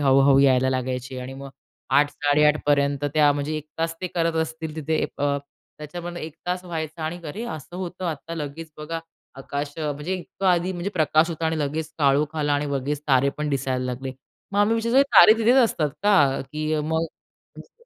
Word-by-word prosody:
हळुहळू 135 0 +5
यायला 130 -1 +4
लागायचे 130 0 -3
आणि 130 +1 -7
मग 135 0 -9 0.5
8-8:30 150 +1 +3
पर्यंत 140 -1 +2
त्या 150 -1 +5
म्हणजे 145 +2 -2
1 155 - -11
तास 165 0 -1
ते 185 - -2
करत 165 -1 +1
असतील 160 -1 -6
तिथे 155 +1 -1 0.2
अ, 140 0 +1 0.4
त्याच्यामध्ये 175 +3 -7
1 160 -1 -8
तास 180 +1 -2
व्हायचा 160 -2 -5
आणि 175 +3 -4
अरे, 215 +10 -5
असं 165 - -7
होतं 185 0 -5
आता 165 +1 -4
लगेच 155 +1 -6
बघा 165 +2 -4 0.4
आकाश 145 +1 -4
अ, 150 -2 -1
म्हणजे 150 +6 -4
इतकं 190 +1 -5
आधी 180 0 +2
म्हणजे 180 +2 -3
प्रकाश 155 -1 +3
होता 165 0 -2
आणि 160 0 -1
लगेच 155 +2 -3
काळोख 145 +2 +2
आला 150 -1 +1
आणि 145 +1 0
लगेच 140 +2 -2
तारे 135 0 +4
पण 150 0 -1
दिसायला 130 -2 -1
लागले. 130 +1 -4 0.4
मग 200 - 0
आम्ही 215 +2 +3
विचारतो 230 +4 +3
तारे 215 - +10
तिथेच 230 +3 +4
असतात 155 -9 0
का? 150 -10 +4
की 155 +1 -1
मग 160 +2 0 0.5
मस्त - - -13
150 Hz, 185 wpm, -24 LUFS, 140-165 Hz, 0.5 s, तारे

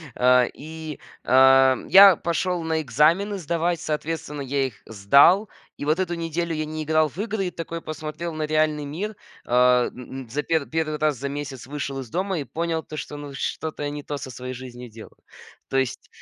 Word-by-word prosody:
А 125 0 +5
и, 155 -1 -8 0.3
а, 130 0 +6
я 195 -2 +9
пошёл 175 +1 -1
на 160 -1 0
экзамены 160 - +2
сдавать, 170 0 -1
соответственно, 150 -1 -4
я 135 0 0
их 115 - -11
сдал. 140 - +4 0.3
И - - -6
вот 155 +4 +1
эту 180 -2 -1
неделю 165 0 -2
я 155 - -2
не 155 0 -5
играл 155 0 +2
в - - -19
игры 210 -3 -2
и - - -4
такой 165 0 -6
посмотрел 155 +2 -6
на 155 -1 -2
реальный 155 -1 +1
мир. 195 +9 -5 0.3
Э, 125 0 +4
н 130 +1 -8
на 115 - -17
за 145 +5 -2
пер 160 -3 0
первый 160 -1 -2
раз 150 -2 +1
за 140 +3 -4
месяц 140 -3 -6
вышел 140 -1 -4
из 125 -4 -8
дома 185 - -1
и 140 - -4
понял, 165 +1 -2
то 155 - -9
что, 150 - -6
ну, 145 -1 -8
что-то 150 +2 -4
я 145 - -1
не 145 0 -6
то 145 - -4
со 135 -2 -7
своей 125 +1 -6
жизнью 125 -1 -9
делаю. 110 0 -13 0.5
То 135 - 0
есть 130 -2 -2
150 Hz, 200 wpm, -24 LUFS, 135-165 Hz, 0.5 s, я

